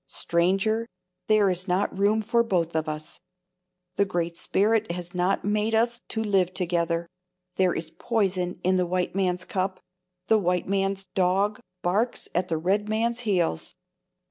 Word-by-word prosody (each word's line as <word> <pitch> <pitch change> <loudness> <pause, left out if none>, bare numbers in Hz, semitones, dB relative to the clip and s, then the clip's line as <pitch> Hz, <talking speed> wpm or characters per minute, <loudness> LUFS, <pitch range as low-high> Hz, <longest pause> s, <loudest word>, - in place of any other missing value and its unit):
Stranger, 195 +7 +1 0.4
there 215 -2 +4
is 180 +2 -4
not 185 +2 0
room 205 +3 +2
for 235 +2 +3
us - - -11 0.2
both. 155 -1 -4 0.8
The 200 - +4
Great 170 -3 -2
Spirit 215 +3 +1
has 175 0 -6
not 180 +2 0
made 210 +2 +1
us 235 +1 +1
to 220 - -2
live 190 -4 +1
together. 170 -2 0 0.5
There 185 -2 +3
is 160 -1 -4
poison 190 -7 -1
in 185 +1 +3
the 180 -1 +1
white 180 0 -1
man's 185 -1 0
cup; 185 0 -2 0.5
the 220 +2 +4
white 180 -2 0
man's 195 0 0
dog 195 +3 +1 0.2
barks 210 +7 0
at 180 +1 0
the 165 - -1
red 200 +6 0
man's 230 +2 0
heels. 175 - 0
190 Hz, 150 wpm, -26 LUFS, 180-210 Hz, 0.8 s, there